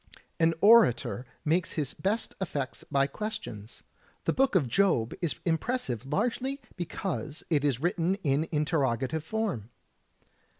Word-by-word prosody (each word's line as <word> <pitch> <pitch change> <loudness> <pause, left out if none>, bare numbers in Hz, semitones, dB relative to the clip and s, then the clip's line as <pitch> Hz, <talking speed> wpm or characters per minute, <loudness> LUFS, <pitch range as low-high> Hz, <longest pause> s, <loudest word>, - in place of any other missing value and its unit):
An 165 0 +4
orator 165 - +5 0.2
makes 165 +4 +1
his 145 -4 -2
best 210 +4 -1
effects 145 -7 -3
by 140 0 +2
questions. 140 - -6 0.4
The - - +1
Book 270 -4 +2
of 155 -8 +4
Job 120 - +2
is 170 -4 0
impressive 160 - -1
largely 250 - -1 0.2
because 165 -3 -4
it 145 -3 +3
is 140 -5 +1
written 175 +3 +1
in 145 +1 +2
interroga 145 -6 0
tive 160 +4 -3
form. 175 - -2
160 Hz, 130 wpm, -29 LUFS, 135-195 Hz, 0.4 s, orator